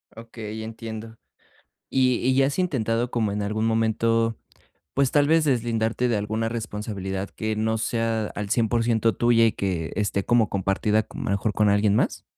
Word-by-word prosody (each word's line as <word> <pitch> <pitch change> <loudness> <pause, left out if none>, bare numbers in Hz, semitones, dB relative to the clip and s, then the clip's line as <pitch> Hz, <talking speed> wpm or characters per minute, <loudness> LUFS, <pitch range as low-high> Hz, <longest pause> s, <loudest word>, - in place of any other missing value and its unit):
Okey, 110 -1 -7
entiendo, 115 0 -7 0.7
¿y 130 -2 +3
y 130 +2 +1
ya 135 0 +4
has 140 - -3
intentado 120 - 0
como 110 -4 0
en 105 0 -2
algún 110 +2 -1
momento, 115 0 +1 0.6
pues, 135 -1 +2
tal 145 -1 +3
vez 160 +2 +4
deslindarte 120 -3 0
de 120 - +1
alguna 110 +2 -1
responsabilidad 105 -4 -4
que 110 -1 -3
no 110 +1 0
sea 115 -1 -1
al 105 -1 -4
100% 115 -1 +2
tuya 115 -1 +4
y 110 - +2
que 90 -5 -3
esté 100 -2 0
como 120 -2 +3
compartida, 100 +3 +1
con - - -9
a - - -4
lo - - -1
mejor 100 +2 0
con 105 -1 +3
alguien 100 +1 +3
más? - - 0
110 Hz, 175 wpm, -24 LUFS, 105-115 Hz, 0.7 s, ya